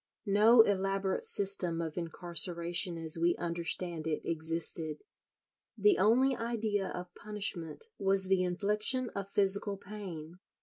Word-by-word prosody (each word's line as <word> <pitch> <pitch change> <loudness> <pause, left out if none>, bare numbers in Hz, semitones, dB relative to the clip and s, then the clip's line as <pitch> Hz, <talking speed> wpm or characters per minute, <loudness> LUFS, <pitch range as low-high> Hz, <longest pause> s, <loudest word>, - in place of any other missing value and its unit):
No 215 +4 +6
elaborate 195 -1 -1
system 190 -4 +2
of 160 -2 -4
incarceration 170 +1 -2
as 165 0 0
we 170 +1 +3
understand 170 -1 -2
it 155 - -3
existed. 160 -1 0 0.7
The 415 -3 +3
only 255 +5 +3
idea 220 -4 -2
of 180 0 -7
punishment 205 - -4
was 195 0 +2
the 190 -1 +2
infliction 210 +7 -1
of 200 0 -6
physical 200 0 +2
pain. 185 -5 -9
190 Hz, 120 wpm, -31 LUFS, 170-205 Hz, 0.7 s, No